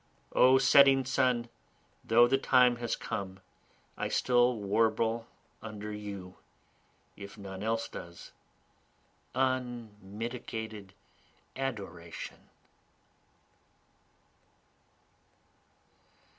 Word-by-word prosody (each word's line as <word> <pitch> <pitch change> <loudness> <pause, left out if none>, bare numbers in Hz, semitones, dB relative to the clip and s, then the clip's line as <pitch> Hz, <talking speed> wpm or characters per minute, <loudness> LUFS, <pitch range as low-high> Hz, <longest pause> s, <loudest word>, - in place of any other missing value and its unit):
O 130 +1 +6
setting 135 0 +6
sun! 125 -3 +1 0.6
though 120 +2 +5
the 135 +2 +2
time 125 -2 +4
has 120 -1 -2
come, 95 -1 -5 0.6
I - - -2
still 125 0 +3
warble 110 +2 +1 0.3
under 105 -1 -7
you, 100 -3 -7 0.8
if 100 +1 -10
none 95 -2 -8
else 115 +1 -1
does, 85 0 -10 1.0
unmitigated 115 -4 -4 0.6
adoration. 100 -11 -6
115 Hz, 70 wpm, -31 LUFS, 100-125 Hz, 1.0 s, O